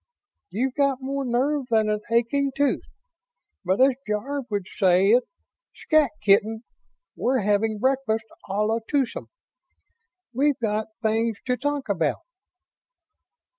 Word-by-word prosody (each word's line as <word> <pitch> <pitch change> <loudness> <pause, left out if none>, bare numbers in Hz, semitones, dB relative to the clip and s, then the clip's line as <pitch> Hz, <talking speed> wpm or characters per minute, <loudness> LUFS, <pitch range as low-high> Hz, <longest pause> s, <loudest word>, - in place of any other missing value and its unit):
"You've 250 +8 -1
got 275 -2 +1
more 275 +1 -3
nerve 265 +3 0
than 220 -2 +3
an 210 0 0
aching 255 +4 +1
tooth. 285 -1 +1 0.8
But 185 +1 0
as 270 +1 +6 0.2
Jarve 260 +6 -2
would 200 -3 -2
say 190 0 +3
it, 245 +2 +4 0.5
'scat, 310 -4 +2
kitten'. 215 +3 +3 0.5
We're 255 0 +1
having 210 +2 +1
breakfast 255 -2 0 0.2
a - - -3
la 225 +2 +1
twosome. 270 -5 -1 1.1
We've 280 +3 +2
got 215 -2 -1 0.2
things 225 0 +1
to 250 - +1
talk 290 +1 -2
about." 170 -7 0
235 Hz, 125 wpm, -24 LUFS, 210-270 Hz, 1.1 s, as